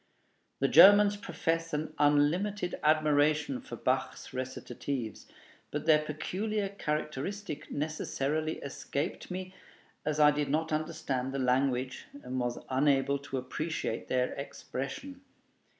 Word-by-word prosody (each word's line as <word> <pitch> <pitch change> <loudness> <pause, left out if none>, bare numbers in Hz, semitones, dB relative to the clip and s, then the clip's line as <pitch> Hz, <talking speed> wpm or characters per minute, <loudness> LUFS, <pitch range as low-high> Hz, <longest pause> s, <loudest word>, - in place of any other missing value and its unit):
The 135 - +4
Germans 205 +7 +8
profess 165 -4 -2
an 155 +1 -3
unlimited 175 +7 +2
admiration 150 -2 +3
for - - -8
Bach's - - -2
recitatives; 130 -2 -4 0.4
but 150 0 -4
their 155 -2 +6
peculiar 195 +7 -2
characteristic 155 +1 -4
necessarily 155 0 -1
escaped 140 +1 -4
me, 185 0 -5 0.5
as 150 0 -1
I 150 0 +7
did 145 -1 -1
not 160 +3 0
understand 155 -5 -2
the 135 - -3
language 130 0 0 0.2
and 130 +1 -3
was 120 -1 -1
unable 140 +1 +2
to 135 -1 -5
appreciate 130 -1 -3
their 125 0 +1
expression. 140 - -6
150 Hz, 115 wpm, -31 LUFS, 135-165 Hz, 0.5 s, Germans